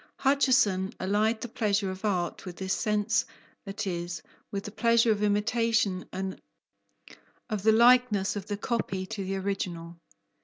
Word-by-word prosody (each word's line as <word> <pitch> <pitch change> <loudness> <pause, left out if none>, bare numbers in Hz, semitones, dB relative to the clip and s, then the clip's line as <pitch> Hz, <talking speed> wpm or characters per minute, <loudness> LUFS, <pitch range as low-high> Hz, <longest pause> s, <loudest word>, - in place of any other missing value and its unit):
Hutcheson 250 -9 +2
allied 215 +4 +1
the - - -4
pleasure 205 -4 0
of 185 +2 -9
art 180 -5 -1
with 180 -2 -8
this 190 0 -2
sense, 210 0 +1 0.4
that 200 +2 -4
is, 175 -2 -4 0.3
with 200 -1 -4
the 210 - -7
pleasure 230 +1 +3
of 210 -1 0
imitation 210 -2 +1
and 190 0 -5 1.1
of 210 -2 -1
the 220 +3 +5
likeness 235 -4 +4
of 205 0 -5
the 205 - -3
copy 205 -4 -2
to 200 0 -5
the 190 +1 -3
original. 180 -4 -4
205 Hz, 150 wpm, -28 LUFS, 190-220 Hz, 1.1 s, the